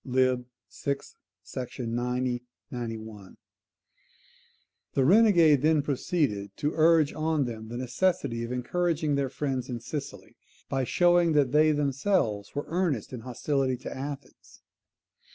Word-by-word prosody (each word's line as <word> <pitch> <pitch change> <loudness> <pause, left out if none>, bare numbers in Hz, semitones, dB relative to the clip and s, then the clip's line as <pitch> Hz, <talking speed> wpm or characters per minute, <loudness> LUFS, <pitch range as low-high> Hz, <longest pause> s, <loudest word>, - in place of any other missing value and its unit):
vi 130 -1 +2 0.3
sec. 140 0 -3 0.5
90,91.] 120 -3 -4 1.6
The 135 - +3
renegade 170 - +6
then 155 0 +3
proceeded 135 - -1
to 150 - 0
urge 160 -2 +4
on 155 -2 0
them 110 -2 -6
the 120 +2 -6
necessity 130 -2 0
of 115 - -5
encouraging 155 +4 0
their 140 -1 0
friends 135 -2 -3
in 120 -2 -3
Sicily, 120 -6 -7 0.3
by 135 -1 -1
showing 175 +3 +3
that 140 -4 +3
they 155 +2 +5
themselves 140 - 0
were 145 - -2
earnest 160 - -1
in 125 - -5
hostility 130 +2 -1
to 125 - -7
Athens. 140 +1 -8
135 Hz, 115 wpm, -28 LUFS, 120-155 Hz, 1.6 s, renegade